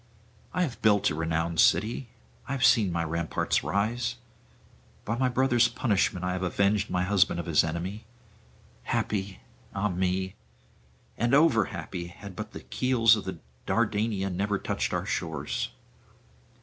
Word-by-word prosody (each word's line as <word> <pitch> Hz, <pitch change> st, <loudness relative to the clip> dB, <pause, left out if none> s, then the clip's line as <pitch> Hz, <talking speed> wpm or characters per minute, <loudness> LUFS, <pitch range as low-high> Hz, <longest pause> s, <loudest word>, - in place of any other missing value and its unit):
I 180 Hz, -, +1 dB
have 135 Hz, -8 st, -4 dB
built 105 Hz, -5 st, +4 dB
a -, -, -1 dB
renowned 80 Hz, +1 st, -1 dB
city; 115 Hz, +7 st, +3 dB, 0.4 s
I 140 Hz, -, -2 dB
have 135 Hz, -1 st, +2 dB
seen 105 Hz, -7 st, +5 dB
my 85 Hz, -1 st, -1 dB
ramparts 85 Hz, 0 st, -1 dB
rise; 115 Hz, +4 st, -1 dB, 0.9 s
by 115 Hz, -, -1 dB
my 130 Hz, +1 st, +1 dB
brother's 125 Hz, -1 st, +3 dB
punishment 95 Hz, -5 st, 0 dB
I 90 Hz, -, 0 dB
have 90 Hz, 0 st, -3 dB
avenged 100 Hz, +3 st, +1 dB
my 90 Hz, 0 st, 0 dB
husband 95 Hz, -2 st, +2 dB
of 85 Hz, -, -4 dB
his 85 Hz, -3 st, +3 dB
enemy; 90 Hz, +7 st, -4 dB, 0.8 s
happy, 100 Hz, -2 st, -2 dB, 0.3 s
ah 100 Hz, +2 st, 0 dB
me! 95 Hz, +1 st, -1 dB, 0.9 s
and 120 Hz, +3 st, +3 dB
over 145 Hz, -8 st, +5 dB
happy, 85 Hz, 0 st, -6 dB
had 95 Hz, +2 st, -11 dB
but 110 Hz, +2 st, -6 dB
the -, -, -8 dB
keels 120 Hz, -3 st, +3 dB
of 95 Hz, -4 st, -5 dB, 0.3 s
Dardania 105 Hz, -3 st, 0 dB
never 100 Hz, +3 st, 0 dB
touched -, -, -2 dB
our -, -, -1 dB
shores!' 80 Hz, -4 st, -2 dB
100 Hz, 145 wpm, -28 LUFS, 90-115 Hz, 0.9 s, seen